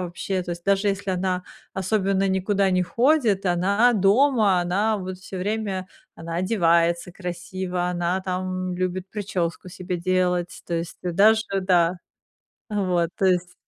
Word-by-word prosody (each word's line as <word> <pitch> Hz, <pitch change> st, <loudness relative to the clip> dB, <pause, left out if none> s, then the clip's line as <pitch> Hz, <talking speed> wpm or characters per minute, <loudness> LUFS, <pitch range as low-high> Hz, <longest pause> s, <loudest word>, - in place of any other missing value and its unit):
вообще. 180 Hz, +1 st, -3 dB
То 175 Hz, -, -7 dB
есть 170 Hz, 0 st, -9 dB
даже 200 Hz, +1 st, +2 dB
если 195 Hz, 0 st, -2 dB
она 185 Hz, 0 st, -1 dB, 0.3 s
особенно 195 Hz, 0 st, +1 dB
никуда 195 Hz, +1 st, +1 dB
не 185 Hz, 0 st, +2 dB
ходит, 235 Hz, -, +2 dB
она 200 Hz, +7 st, +3 dB
дома, 210 Hz, -1 st, +3 dB
она 205 Hz, +5 st, +1 dB
вот 185 Hz, -1 st, -6 dB
всё 190 Hz, 0 st, -9 dB
время, 200 Hz, -1 st, -2 dB, 0.3 s
она 165 Hz, 0 st, -6 dB
одевается 170 Hz, -2 st, +2 dB
красиво, 180 Hz, 0 st, -4 dB
она 175 Hz, +1 st, -1 dB
там 185 Hz, 0 st, -3 dB
любит 185 Hz, +1 st, -3 dB
причёску 185 Hz, -4 st, -3 dB
себе 180 Hz, -1 st, -5 dB
делать, 180 Hz, 0 st, 0 dB
то 175 Hz, -, -6 dB
есть 165 Hz, +1 st, -4 dB
даже, 205 Hz, +5 st, +4 dB, 0.2 s
да 180 Hz, -1 st, +2 dB, 0.7 s
а, 210 Hz, -1 st, -1 dB
вот 175 Hz, -3 st, +1 dB
то 195 Hz, -, +1 dB
есть 180 Hz, -1 st, +1 dB
185 Hz, 145 wpm, -24 LUFS, 180-200 Hz, 0.7 s, даже